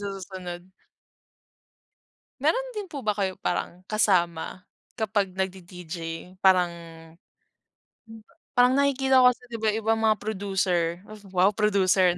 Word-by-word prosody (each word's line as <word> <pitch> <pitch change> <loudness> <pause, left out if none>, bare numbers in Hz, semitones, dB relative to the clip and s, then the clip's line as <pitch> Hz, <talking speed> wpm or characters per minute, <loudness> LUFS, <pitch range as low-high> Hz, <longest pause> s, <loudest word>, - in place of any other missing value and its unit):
sa 200 - -4
susunod. 185 -2 -8 1.7
Meron - - +1
din 420 -4 -6
po 280 -6 -7
ba 210 - +2
kayo 190 -2 -1
parang, 175 +1 -3
kasama 180 -4 +1 0.3
kapag 205 -4 0
nagdi-DJ? 180 -2 -5 0.4
Parang, 185 -2 +4 1.4
hmm, 225 0 -12
ba - - -27 0.2
parang 245 0 +6
nakikita 270 -2 +3
ko 255 - +6
kasi, - - -30
'di 230 - -4
ba, 220 - -3
'yong 215 +1 +1
ibang 225 0 +2
mga 220 -1 +3
producer, 190 -5 -1 0.3
wow, 185 +2 +4
producer 190 -4 +3
na, - - -9
195 Hz, 135 wpm, -26 LUFS, 180-220 Hz, 1.7 s, parang